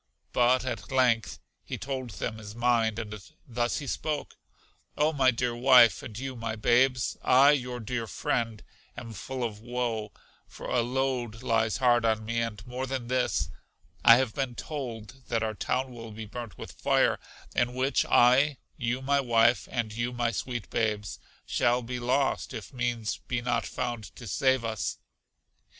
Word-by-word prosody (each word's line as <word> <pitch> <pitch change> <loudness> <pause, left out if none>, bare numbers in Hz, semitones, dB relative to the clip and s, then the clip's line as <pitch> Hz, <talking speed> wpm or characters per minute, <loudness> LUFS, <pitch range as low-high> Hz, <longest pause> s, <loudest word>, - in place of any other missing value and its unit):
But 125 +1 +3
at 115 -4 -4
length 120 -4 +2 0.3
he - - -5
told 130 -2 -4
them 110 +1 -4
his 105 0 -9
mind, 115 -2 +2
and 105 -2 -5 0.3
thus 120 -1 -1
he 145 - -5
spoke, 150 +2 -3 0.6
O 150 +2 +3
my 135 -3 +4
dear 120 -1 0
wife, 125 -2 +6
and 110 - -8
you 130 +1 -4
my 115 -1 -3
babes, 120 +2 +2
I, 135 +3 +6
your 125 -4 -1
dear 115 0 -3
friend, 115 0 -2 0.3
am 115 -2 -7
full 130 +5 -5
of 110 -3 -3
woe, 115 -2 -3 0.4
for - - -11
a 125 - +2
load 125 -2 -2
lies 110 -3 +1
hard 120 -2 +4
on 110 -1 +1
me; 115 +1 -1
and 110 -2 -4
more 125 +2 -4
than 130 -2 -4
this, 125 -1 0 0.5
I 115 - +10
have 125 -3 +1
been 130 -2 -2
told 130 -4 -7
that 115 -1 0
our 110 -1 -1
town 130 +4 -1
will 115 -1 -8
be 110 0 -7
burnt 115 0 -8
with - - -8
fire, - - +2 0.4
in 120 +1 +1
which 130 +2 +2
I, 130 +4 +5 0.2
you 125 +2 -2
my 140 +1 +2
wife, 120 -2 +3
and 115 -4 -2
you 120 +2 -2
my 120 -1 0
sweet 120 +1 -4
babes, 105 -6 -1 0.3
shall 120 +1 +1
be 125 +1 -4
lost, 130 +2 0
if 110 +2 -8
means 120 -8 -1
be 125 - 0
not 120 -1 -1
found 120 -3 -3
to 120 - -10
save 130 +3 +2
us. 110 -1 -2
120 Hz, 170 wpm, -28 LUFS, 115-130 Hz, 0.6 s, I